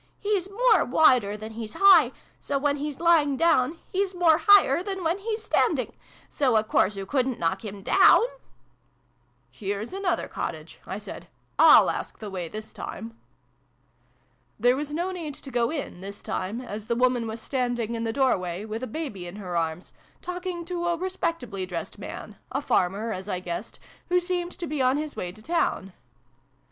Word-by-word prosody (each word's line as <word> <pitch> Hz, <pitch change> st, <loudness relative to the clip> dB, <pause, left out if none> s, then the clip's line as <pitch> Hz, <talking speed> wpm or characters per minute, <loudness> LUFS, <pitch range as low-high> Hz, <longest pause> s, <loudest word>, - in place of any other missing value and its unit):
" -, -, -40 dB
He's 405 Hz, -3 st, -1 dB
more 445 Hz, 0 st, +4 dB
wider 245 Hz, -7 st, +4 dB
than 215 Hz, +1 st, -8 dB
he's 220 Hz, -1 st, -6 dB
high: 360 Hz, -10 st, +6 dB, 0.3 s
so, 280 Hz, -, -2 dB
when 285 Hz, +1 st, +1 dB
he's 290 Hz, -1 st, -5 dB
lying 320 Hz, -5 st, +4 dB
down, 325 Hz, -2 st, +3 dB
he's 385 Hz, -1 st, -1 dB
more 335 Hz, -3 st, +4 dB
higher 390 Hz, -7 st, +7 dB
than 385 Hz, -1 st, -4 dB
when 335 Hz, +4 st, 0 dB
he's 435 Hz, +1 st, -3 dB
standing: -, -, +1 dB, 0.3 s
so 260 Hz, -5 st, +1 dB
a 215 Hz, -, +3 dB
course 210 Hz, -1 st, +1 dB
oo 195 Hz, -, -4 dB
couldn't 260 Hz, +2 st, 0 dB
knock 180 Hz, +4 st, -1 dB
him 200 Hz, -2 st, -7 dB
down! -, -, +6 dB, 0.5 s
" -, -, -41 dB, 0.2 s
" -, -, -40 dB, 0.3 s
Here's 205 Hz, -, -4 dB
another 390 Hz, -2 st, -1 dB
cottage," -, -, -6 dB
I -, -, -4 dB
said: -, -, -9 dB, 0.3 s
"/Y/ask -, -, +5 dB
the 210 Hz, -2 st, -7 dB
way, 180 Hz, -3 st, -4 dB
this 215 Hz, +3 st, -8 dB
time." 225 Hz, 0 st, -7 dB, 1.4 s
There 245 Hz, +3 st, +4 dB
was 295 Hz, +2 st, -4 dB
no 345 Hz, +5 st, -2 dB
need 325 Hz, -6 st, -5 dB
to 270 Hz, -, -10 dB
go 235 Hz, -1 st, +1 dB
in, 285 Hz, -, -5 dB
this 200 Hz, +1 st, -8 dB
time, 205 Hz, +6 st, -3 dB
as 215 Hz, -3 st, -7 dB
the 235 Hz, -, 0 dB
woman 245 Hz, -1 st, +2 dB
was 220 Hz, +1 st, -5 dB
standing 245 Hz, -2 st, -2 dB
in 230 Hz, 0 st, -3 dB
the 225 Hz, -, -1 dB
doorway, 195 Hz, -8 st, 0 dB
with 220 Hz, +1 st, -5 dB
a 255 Hz, -, -3 dB
baby 215 Hz, -, -5 dB
in 175 Hz, -, -8 dB
her 185 Hz, -4 st, -6 dB
arms, 165 Hz, +1 st, -2 dB, 0.3 s
talking 360 Hz, -1 st, -5 dB
to 345 Hz, 0 st, -3 dB
a 345 Hz, -1 st, +1 dB
respectably 330 Hz, -, -3 dB
dressed 175 Hz, -2 st, -6 dB
man -, -, -8 dB
a -, -, -2 dB
farmer, 200 Hz, +5 st, 0 dB
as 190 Hz, +2 st, -7 dB
I 185 Hz, -, -1 dB
guessed 180 Hz, +3 st, -6 dB, 0.3 s
who 360 Hz, 0 st, +4 dB
seemed 355 Hz, 0 st, -2 dB
to 350 Hz, -, -6 dB
be 300 Hz, -3 st, -2 dB
on 255 Hz, +2 st, +3 dB
his 300 Hz, 0 st, -4 dB
way 180 Hz, -, -4 dB
to 215 Hz, +4 st, -16 dB
the -, -, -16 dB
town. 260 Hz, -, 0 dB
255 Hz, 185 wpm, -26 LUFS, 210-340 Hz, 1.4 s, higher